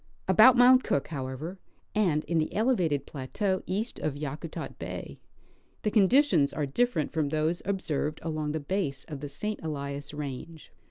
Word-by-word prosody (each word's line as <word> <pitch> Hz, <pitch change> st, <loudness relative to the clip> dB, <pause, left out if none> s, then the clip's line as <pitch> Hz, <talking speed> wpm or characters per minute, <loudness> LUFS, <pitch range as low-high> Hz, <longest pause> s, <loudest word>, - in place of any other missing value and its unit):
Al)Out 215 Hz, +7 st, +8 dB
Mount 255 Hz, +1 st, +7 dB
Cook, 140 Hz, -, 0 dB
however, 145 Hz, +5 st, -5 dB, 0.3 s
and 175 Hz, -8 st, +2 dB
in 170 Hz, -1 st, +1 dB
the 155 Hz, -, -1 dB
elevated 185 Hz, -, +1 dB
plateau 185 Hz, +8 st, -2 dB
east 215 Hz, +6 st, -2 dB
of 150 Hz, -2 st, -2 dB
Yakutat 150 Hz, +3 st, -6 dB
bay, -, -, -6 dB, 0.6 s
the 210 Hz, -, +1 dB
conditions 215 Hz, -, +4 dB
are 150 Hz, -, -1 dB
different 195 Hz, -, 0 dB
from 155 Hz, -3 st, 0 dB
those 155 Hz, +3 st, 0 dB
observed 155 Hz, -6 st, -2 dB
along 155 Hz, -2 st, -2 dB
the 160 Hz, -, -1 dB
base 145 Hz, -3 st, -2 dB
of 150 Hz, -3 st, -7 dB
the 145 Hz, +1 st, -6 dB
St. 210 Hz, +9 st, -4 dB
Elias 140 Hz, -2 st, -4 dB
range. 150 Hz, +2 st, -7 dB
160 Hz, 155 wpm, -28 LUFS, 145-200 Hz, 0.6 s, Al)Out